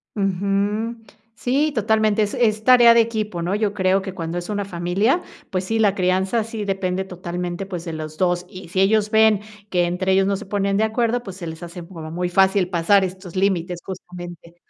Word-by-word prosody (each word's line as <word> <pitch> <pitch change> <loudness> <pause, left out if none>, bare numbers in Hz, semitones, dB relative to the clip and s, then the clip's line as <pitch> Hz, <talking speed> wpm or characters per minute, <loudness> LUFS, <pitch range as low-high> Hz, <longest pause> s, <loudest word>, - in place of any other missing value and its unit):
Ujú. 200 +3 0 0.4
Sí, 285 +5 +1
totalmente, 215 -2 +2
es 205 - -3
es 220 -4 +1
tarea 240 -1 +7
de 235 - +7
equipo, 215 -6 -2
¿no? 180 +3 -1
Yo 210 -1 0
creo 190 -1 +2
que 190 -1 -6
cuando 165 0 -3
es 175 - -8
una 205 -1 -2
familia, 195 - 0 0.3
pues 185 -1 -1
sí, 225 +4 -1
la 210 -3 +3
crianza 190 +4 +1
sí 220 -1 -5
depende 190 -1 -1
totalmente, 180 0 -5
pues, 180 -3 -6
de 165 - -5
los 155 0 -6
2, 180 0 +1
y 185 -2 -10
si 185 +2 +1
ellos 210 +2 +3
ven 220 -2 +5 0.3
que 175 -3 +2
entre 185 +2 0
ellos 190 0 +4
no 200 0 +1
se 190 - -8
ponen 200 -1 0
de 220 - +2
acuerdo, 235 +2 0
pues 195 -5 -9
se 175 - -7
les 160 +1 -7
hace 175 0 -8
como 165 -4 -8
muy 180 +2 -2
fácil 190 0 +3
pasar 180 +4 +3
estos 185 -1 -6
límites, 180 -2 0
justamente 175 -2 -9
195 Hz, 205 wpm, -22 LUFS, 180-215 Hz, 0.4 s, tarea